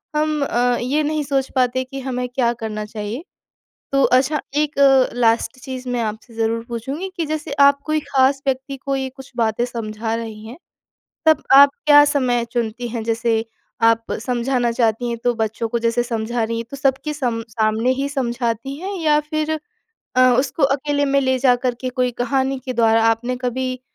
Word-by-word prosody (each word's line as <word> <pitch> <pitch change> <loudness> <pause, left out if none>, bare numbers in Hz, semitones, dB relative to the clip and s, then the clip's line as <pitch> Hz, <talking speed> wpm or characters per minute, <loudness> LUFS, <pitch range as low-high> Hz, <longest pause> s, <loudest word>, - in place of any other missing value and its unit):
हम 305 0 0
अ, 245 -1 +1
ये 280 +5 0
नहीं 305 0 -1
सोच 270 -1 -1
पाते 255 0 +1
कि 270 +1 -8
हमें 250 -1 -3
क्या 245 -1 +1
करना 220 -2 -5
चाहिए? 215 +5 -6 0.7
तो 275 0 +3
अच्छा 270 +4 +3 0.2
एक 300 0 0
अ, 270 -2 +5
लास्ट 230 0 +1
चीज़ 260 -2 -6
मैं 245 -1 -1
आपसे 220 +2 -5
ज़रूर 225 0 -1
पूछूँगी 270 - -4
कि 335 -3 -2
जैसे 310 0 -4
आप 280 0 +6
कोई 310 0 +1
ख़ास 275 -1 +2
व्यक्ति 270 +1 -2
को 275 0 -3
ये 265 -1 -2
कुछ 265 -1 -12
बातें 230 0 +1
समझा 225 -2 -4
रही 220 -2 -6
हैं, 235 +4 -9 0.7
तब 315 -2 +4
आप 280 +1 +9 0.2
क्या 290 -1 +8
समय 255 -5 +1
चुनती 240 0 -2
हैं, 230 -1 -4
जैसे 230 0 0 0.4
आप 230 0 +3
समझाना 245 -1 0
चाहती 230 0 0
हैं 235 - -3
तो 245 - +2
बच्चों 225 +1 -2
को, 235 - -1
जैसे 230 +1 +1
समझा 235 0 -2
रही 230 +1 -2
हैं, 230 - -4
तो 275 - -6
सब 265 -1 +2
के 300 - -2
सम 245 -6 -2
सामने 220 +1 0
ही 280 - 0
समझाती 245 -1 -2
हैं 390 +3 -4
या 300 -2 +3
फिर 310 0 -1 0.6
अ, - - +5 0.2
उसको 275 +3 -1
अकेले 285 +1 +1
में 275 0 +2
ले 260 -1 +1
जाकर 250 -1 +2
के 255 - -2
कोई 250 -1 0
कहानी 270 +1 0
के 255 - -3
द्वारा, 225 -1 +3
आपने 240 +3 0
कभी, 255 +1 -3
250 Hz, 190 wpm, -20 LUFS, 230-275 Hz, 0.7 s, आप